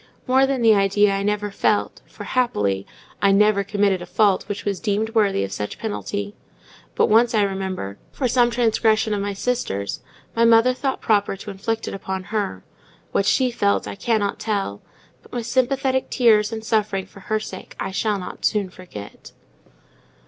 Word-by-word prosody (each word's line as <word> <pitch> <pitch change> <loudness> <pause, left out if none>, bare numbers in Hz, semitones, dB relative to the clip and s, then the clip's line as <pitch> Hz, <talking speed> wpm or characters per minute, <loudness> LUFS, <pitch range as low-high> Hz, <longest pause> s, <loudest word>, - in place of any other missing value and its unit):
More 265 +1 +4
than 265 -3 -1
the 225 -1 +7
idea 200 0 +3
I 195 - -1
never 210 0 -1
felt, - - 0
for, - - -10
happily, 100 - 0 0.3
I 200 - +4
never 200 0 +4
committed 200 -2 +1
a 175 - -7
fault 200 0 +2
that 205 - -5
was 200 -2 -1
deemed 215 +1 -1
worthy 205 - +2
of 95 - -4
such 105 +1 -4
penalty; 205 -2 -4 0.6
but - - +4
once 230 +2 +4
I 210 - +4
remember, 190 - -3
for 260 - -1
some 240 0 +3
transgression 220 -2 +2
of 205 - -1
my 200 0 -2
sister's, 195 - -2 0.4
our 230 - +3
mother 230 +2 +5
thought 265 +1 -2
proper 205 -2 +1
to 205 +2 -8
inflict 225 +3 -3
it - - -4
upon 190 -1 -4
her: 195 - -2 0.5
what 200 - +1
she 255 +2 +3
felt, 200 -4 +1
I - - -5
cannot 205 -1 -1
tell; 200 - -2 0.4
but - - -20
my 240 -1 -2
sympathetic 260 +2 0
tears 220 -3 +4
and 220 -1 -5
suffering 210 -4 0
for 195 - -15
her 215 +2 -1
sake 190 -3 -9
I - - -3
shall 210 +1 0
not 185 - -8
soon 200 -3 +1
forget. 140 - -11
210 Hz, 180 wpm, -22 LUFS, 195-230 Hz, 0.6 s, the